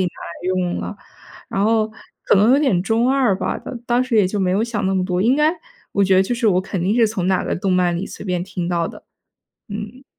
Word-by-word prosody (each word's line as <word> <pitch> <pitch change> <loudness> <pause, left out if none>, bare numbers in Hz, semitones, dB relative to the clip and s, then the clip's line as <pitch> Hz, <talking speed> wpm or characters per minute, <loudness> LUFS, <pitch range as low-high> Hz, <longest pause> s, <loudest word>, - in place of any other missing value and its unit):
拿 - - 0
来 175 +1 -8
用 180 -1 -1
了。 205 - -6 0.5
然 195 - -1
后 220 0 +2 0.4
可 - - +4
能 210 +6 +5
有 275 - +5
点 260 -12 +2
中 230 +5 +2
二 255 -8 +2
吧， 190 - -2
当 250 - -7
当 245 +1 +2
时 250 -3 -1
也 205 -3 +5
就 200 +2 -2
没 185 - +1
有 200 +4 +1
想 210 -4 -2
那 195 - +1
么 185 -1 +1
多， 180 -1 -1
应 240 +7 +3
该 300 +2 +3 0.4
我 200 - +2
觉 190 -1 +4
得 190 - +5
就 240 +6 -2
是 235 -1 0
我 185 -3 +4
肯 190 -2 -4
定 195 +4 +1
是 230 -2 +4
从 205 -5 -2
哪 190 -1 +1
个 - - -1
动 190 +2 -1
漫 180 -1 +2
里 175 +3 -3
随 - - -9
便 180 -2 -1
听 180 -1 -4
到 170 -1 0
的。 - - -12 0.6
嗯。 210 +6 -7
200 Hz, 275 characters per minute, -20 LUFS, 185-230 Hz, 0.6 s, 能